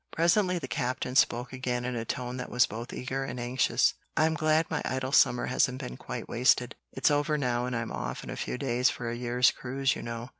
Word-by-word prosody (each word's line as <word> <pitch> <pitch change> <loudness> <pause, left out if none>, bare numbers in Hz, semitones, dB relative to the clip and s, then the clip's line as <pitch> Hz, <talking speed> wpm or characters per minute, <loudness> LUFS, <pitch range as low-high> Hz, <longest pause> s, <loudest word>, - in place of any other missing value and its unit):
Presently 180 +2 +3
the 145 -6 -5
Captain 125 -1 -2
spoke 125 -1 +2
again 125 -1 -2
in 125 -1 -2
a 115 -1 -3
tone 125 +1 -4
that 125 - -5
was 125 0 +4
both 115 +2 -7
eager 130 +2 -3
and 125 -2 -5
anxious, 125 +2 +2 0.2
"I'm 160 +1 +3
glad 155 +1 +2
my 160 - -2
idle 130 0 -2
summer 125 -3 +4
hasn't 125 0 +1
been 60 - -6
quite - - -6
wasted. 125 +1 +2 0.2
It's 135 +2 +2
over 145 +1 +1
now, 125 -3 0
and 125 - -3
I'm 115 -1 -3
off - - -4
in - - -7
a - - -4
few - - -3
days 125 -2 +2
for 120 -1 -4
a - - -3
year's 125 +1 +3
cruise, 135 +1 -1
you - - -6
know." 115 +1 -6
125 Hz, 225 wpm, -29 LUFS, 120-135 Hz, 0.2 s, was